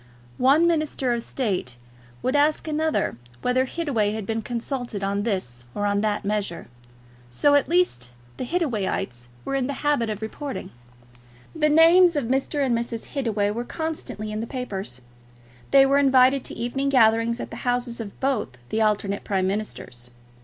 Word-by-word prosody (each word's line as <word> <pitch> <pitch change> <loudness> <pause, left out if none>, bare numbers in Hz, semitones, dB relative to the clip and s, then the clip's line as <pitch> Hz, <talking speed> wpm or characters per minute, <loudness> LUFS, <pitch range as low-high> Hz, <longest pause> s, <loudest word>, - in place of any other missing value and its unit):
One 280 +6 +5
minister 305 -6 +1
of 235 - -1
State 190 - -2 0.5
would 260 - +1
ask 300 +2 +2
another 310 - 0 0.3
whether 255 +1 +2
Hittaway 255 -9 -1
had 220 -2 -4
been 225 +2 -2
consulted 240 -2 -4
on 200 +1 0
this 185 - -2
or 205 - -1
on 205 0 +1
that 210 -2 -1
measure; 200 -4 -2 0.6
so 285 - +3
at 285 0 +3
least 340 - +1 0.3
the - - -3
Hittawayites 215 - -2 0.2
were - - -3
in 270 -2 0
the 280 +1 -5
habit 285 -6 +2
of 215 0 -4
reporting. 270 +5 -5 0.8
The 305 -1 +2
names 335 +3 +6
of 285 -4 0
Mr. 270 +3 0
and 245 -3 +1
Mrs. 230 -1 -4
Hittaway 220 -7 0
were 235 +3 -3
constantly 245 -8 -5
in 215 - -3
the 230 - -4
papers. 195 - -4 0.7
They 275 -1 +7
were 275 +1 +4
invited 265 -1 +5
to - - -7
evening 270 +4 -1
gatherings 230 -2 +3
at - - -6
the - - -7
houses 245 -1 -1
of 200 -3 -9
both 255 - -1
the 220 - 0
alternate 205 -2 0
Prime 190 -2 0
Ministers. 190 - -4
240 Hz, 165 wpm, -24 LUFS, 205-280 Hz, 0.8 s, They